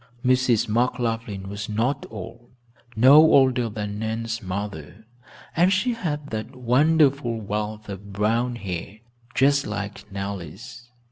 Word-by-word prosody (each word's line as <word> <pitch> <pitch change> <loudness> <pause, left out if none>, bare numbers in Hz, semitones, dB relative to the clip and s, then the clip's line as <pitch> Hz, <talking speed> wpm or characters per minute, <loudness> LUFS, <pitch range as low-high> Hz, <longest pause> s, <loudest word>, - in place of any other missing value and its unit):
Mrs. 125 -3 +3
McLaughlin 115 -3 -1
was 100 +2 -6
not 120 +7 -1
old, 115 +3 -9 0.5
no 130 +6 +7
older 130 -6 +5
than 105 -1 -5
Nan's 110 +1 -3
mother, 95 0 -6 0.5
and 175 +3 +4
she 220 +6 +1
had 150 -9 -4
that 110 +4 -5
wonderful 135 -1 +2
wealth 105 +1 -4
of 100 0 -8
brown 115 +5 0
hair, 100 -1 -6 0.4
just 140 +1 +3
like 105 0 -6
Nellie's. 100 - -7
115 Hz, 120 wpm, -24 LUFS, 105-130 Hz, 0.5 s, no